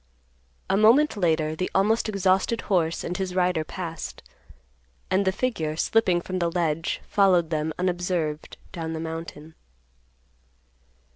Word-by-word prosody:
A 195 - +1
moment 230 +9 +5
later 160 -5 +1
the 185 +3 -2
almost 220 +4 +2
exhausted 195 +3 +1
horse 170 -5 0
and 180 - -3
his 185 -1 -3
rider 180 -3 +1
passed, 165 0 -7 0.9
and 195 +1 +2
the 190 - +3
figure, 185 -9 -2
slipping 180 0 +2
from 185 +1 -4
the 170 -1 +1
ledge, 165 -2 -1
followed 180 -5 +3
them 155 0 -1
unobserved 175 -4 -2
down 165 -2 -5
the 160 - -4
mountain. 160 -1 -7
180 Hz, 130 wpm, -25 LUFS, 160-195 Hz, 0.9 s, moment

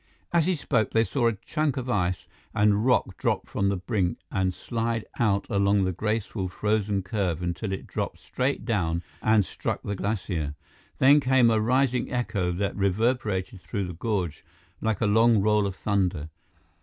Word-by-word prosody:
As 170 -1 +3
he 185 - +2
spoke, 125 -8 0
they 115 - +4
saw 120 0 +1
a 115 - +2
chunk 145 +7 -2
of 130 -1 -3
ice 90 -6 -1 0.3
and 105 +2 +3
rock 110 -7 +2
drop - - 0
from 100 -1 0
the 100 - 0
brink 95 -2 -1
and 95 -1 +1
slide 115 +3 -2
out 100 -4 +2
along 100 -2 +2
the 95 - +1
graceful, 105 0 -2
frozen 105 0 0
curve 90 -4 -2
until 90 +4 -3
it 95 - -4
dropped - - -4
straight 130 -3 -2
down 85 -7 0 0.2
and 110 -3 +4
struck - - -4
the 100 - -3
glacier. 90 -7 -2 0.4
Then 140 +3 +6
came 130 -3 +4
a 110 -1 +2
rising 125 +3 +1
echo 105 -8 -1
that 95 +3 -2
reverberated 100 -1 0
through 100 +1 -3
the 90 - -6
gorge 90 -5 -2 0.4
like 110 -3 -1
a - - +3
long 110 +2 +5
roll 105 0 +3
of 95 - -5
thunder. 90 -7 -1
105 Hz, 170 wpm, -26 LUFS, 95-115 Hz, 0.4 s, Then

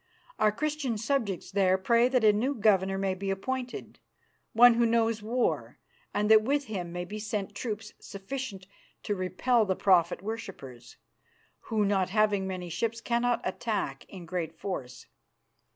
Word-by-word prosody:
Our 215 - +4
Christian 290 -1 -2
subjects 215 -6 -2
there 190 -1 +3
pray 235 +5 +3
that 255 -2 +1
a 210 -1 +6
new 255 +7 0
governor 195 -3 +2
may 195 -1 0
be 195 +1 -4
appointed, 250 +6 -4 0.5
one 245 +1 +7
who 235 0 +2
knows 225 -1 +1
war, 235 +4 -1 0.3
and 205 +1 0
that 220 -1 +8
with 285 +6 0
him 185 -7 -5
may 175 0 -4
be 210 +4 -7
sent 210 -2 -3
troops 215 -3 -5
sufficient 200 -1 -6 0.4
to 205 - -1
repel 220 +5 +1
the 190 -3 0
prophet 180 -2 +3
worshippers, 140 - -8 0.7
who, 215 -2 +1
not 195 -2 +1
having 205 -1 +2
many 185 -2 -5
ships, 230 +7 -2
cannot 240 +1 0
attack 205 +2 -3
in 185 -3 -10
great 165 -2 -4
force. 135 -11 -6
210 Hz, 150 wpm, -29 LUFS, 190-235 Hz, 0.7 s, that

